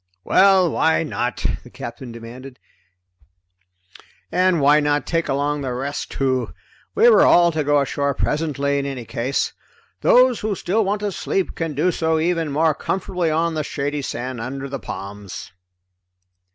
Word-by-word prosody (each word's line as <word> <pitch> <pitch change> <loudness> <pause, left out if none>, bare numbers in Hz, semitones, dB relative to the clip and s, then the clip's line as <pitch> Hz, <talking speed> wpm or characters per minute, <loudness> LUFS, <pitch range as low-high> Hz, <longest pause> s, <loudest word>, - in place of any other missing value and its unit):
"Well, 190 -3 +4
why 160 +2 +2
not?" 120 -7 -3 0.2
the - - -15
Captain 120 +1 -8
demanded. 125 +3 -10 1.7
"And 180 0 +3
why 145 +1 +5
not 145 -1 0
take 165 -1 -1
along 145 +1 0
the 130 -2 -3
rest 140 +3 -4
too? 130 -2 -1 0.4
We 450 +2 +5
were 480 - +7
all 175 -1 +6
to 155 -2 -1
go 145 0 +3
ashore 140 0 -1
presently, 140 -2 -1
in 140 - -3
any 130 -4 -5
case. 125 +5 -2 0.5
Those 250 -2 +4
who 210 -1 -2
still 205 +5 0
want 205 +1 -1
to 205 -1 -1
sleep 190 0 -2
can 165 -3 -4
do 170 +6 +2
so 160 -1 0
even 165 -1 0
more 155 +2 +2
comfortably 180 +1 -2
on 165 +2 +1
the 155 -1 -2
shady 145 +1 -3
sand 125 -2 -5
under 135 +3 -5
the 140 0 -5
palms." 100 0 -8
145 Hz, 155 wpm, -21 LUFS, 135-170 Hz, 1.7 s, were